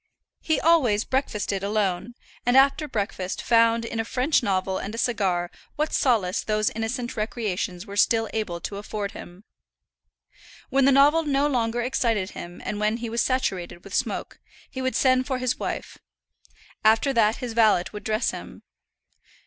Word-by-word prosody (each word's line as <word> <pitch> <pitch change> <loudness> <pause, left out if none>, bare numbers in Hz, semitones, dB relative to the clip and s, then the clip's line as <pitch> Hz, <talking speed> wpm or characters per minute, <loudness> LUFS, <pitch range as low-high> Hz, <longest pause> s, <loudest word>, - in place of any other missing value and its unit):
He 315 - +1
always 255 -11 +3
breakfasted 210 -7 -2
alone, 205 +1 -1 0.3
and 245 +2 +3
after 275 +3 +4
breakfast 200 -6 -3
found 230 0 +3
in 230 - -4
a - - +1
French 255 +6 +1
novel 190 -3 -1
and 205 +3 -5
a - - -7
cigar 190 -7 0 0.2
what 305 +1 -1
solace 215 -9 +2
those 215 0 0
innocent 240 +2 -3
recreations 210 -4 -3
were 200 -2 -8
still 225 +2 +3
able 205 -6 -2
to 200 - -5
afford 205 0 -4
him. 180 +3 -11 1.3
When 270 0 +3
the 275 - +6
novel 285 +4 +5
no 285 -2 +1
longer 240 -4 0
excited 230 -6 0
him 175 +1 -9
and 205 - -3
when 215 +2 +1
he 235 -1 -5
was 235 +1 +1
saturated 185 -9 -1
with - - -11
smoke, - - -2 0.3
he 260 - -5
would 260 0 -1
send 255 -1 +3
for 260 - -1
his 255 -1 -1
wife. - - -5 0.8
After 220 +6 +4
that, 225 -2 +3
his 250 -3 -5
valet 220 -6 +4
would 210 - -8
dress 215 +2 0
him. - - -10
225 Hz, 165 wpm, -25 LUFS, 205-255 Hz, 1.3 s, the